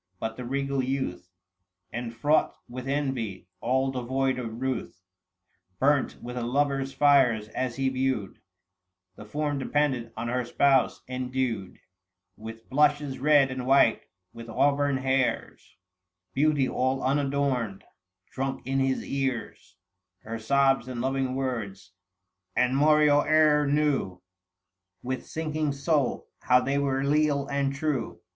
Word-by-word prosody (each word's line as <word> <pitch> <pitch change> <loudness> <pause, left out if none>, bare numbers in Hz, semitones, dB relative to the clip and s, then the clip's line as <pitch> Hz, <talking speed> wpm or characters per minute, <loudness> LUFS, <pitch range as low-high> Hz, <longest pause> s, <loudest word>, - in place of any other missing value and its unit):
But 110 0 -3
the 125 - -7
regal 140 +1 -1
youth, 110 -10 -3 0.6
Enfraught 120 +6 0
with 125 +1 -7
envy 135 -9 -2
— - - -50
all 130 +2 +1
devoid 130 +1 -1
of 115 -2 -6
ruth 130 -8 -3 0.4
— 90 0 -46
Burnt 140 0 +2
with 125 +1 -6
a - - -2
lover's 135 +2 0
fires, 135 -6 +3
as 125 0 -3
he 135 0 0
viewed 130 -6 -1 0.8
The 105 - -11
form 145 +4 -2
dependant 135 -3 0
on 115 +1 -3
her 125 +1 -1
spouse, 135 +2 +2
endued 125 -6 -3
820 - - -33 0.6
With 115 0 -9
blushes 145 -1 +2
red 145 -2 +4
and 130 -1 -5
white, 135 -4 +4 0.3
with 115 0 -10
auburn 140 +3 +2
hairs 130 -7 -1 0.3
— 90 0 -56
Beauty 145 -1 +2
all 130 +1 -1
unadorned; 135 -6 0 0.5
drunk 135 -1 -4
in 135 +1 0
his 135 0 0
ears 135 -3 -4 0.5
Her 115 +1 -5
sobs 135 +2 +2
and 125 -2 -5
loving 130 0 -1
words; 110 -9 -4 0.6
and 125 +1 +2
moreover 150 0 +4
knew, 140 -11 0 0.8
With 130 +1 -4
sinking 155 -2 -2
soul, 140 -1 0
how 125 - +4
they 135 +2 0
were 135 -1 0
leal 145 0 +2
and 140 -1 -1
true. 140 -4 -2
135 Hz, 130 wpm, -27 LUFS, 120-140 Hz, 0.8 s, red